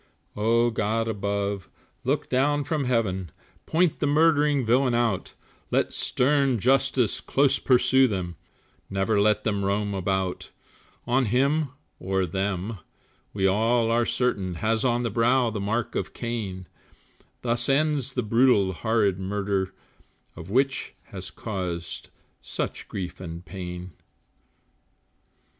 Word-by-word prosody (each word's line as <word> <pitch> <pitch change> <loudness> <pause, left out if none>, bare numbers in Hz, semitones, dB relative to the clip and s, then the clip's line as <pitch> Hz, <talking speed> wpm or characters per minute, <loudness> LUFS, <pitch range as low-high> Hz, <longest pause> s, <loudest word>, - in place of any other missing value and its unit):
Oh, 115 +3 +2
God 115 +1 0
above, 100 -2 -2 0.3
look - - 0
down 145 +3 +2
from 145 -1 -1
Heaven, 100 -8 0 0.4
Point 165 0 +2
the 145 - +1
murdering 150 -3 +3
villains 125 +2 +3
out, 115 -5 0 0.3
Let - - +1
stern 135 -1 +2
justice 130 0 +2
close 140 -1 +2
pursue 130 +1 +4
them, 90 -6 -3 0.5
Never 100 +2 +1
let 105 0 +2
them 100 -2 0
roam 100 +1 0
about; 95 -1 -2 0.6
On 130 +2 +2
him, 140 +6 +2 0.3
or 95 0 0
them, 95 +3 -2 0.5
we 95 -1 -1
all 115 +4 +2
are 120 0 +2
certain, 115 -7 0
Has 110 +5 0
on 120 -1 +1
the 115 - -1
brow 120 +2 +3
the 105 - -4
mark 110 +4 -1
of - - -3
Cain, 105 -6 -4 0.8
Thus 120 +2 0
ends 140 -2 +2
the 125 - -1
brutal 110 -4 +3
horrid 105 -1 +1
murder, 100 0 -1 0.6
Which 130 +11 -1
has - - -6
caused 90 -6 -5 0.3
such - - -4
grief 90 -3 -5
and 85 -1 -7
pain. 90 -1 -7
115 Hz, 120 wpm, -26 LUFS, 95-125 Hz, 0.8 s, pursue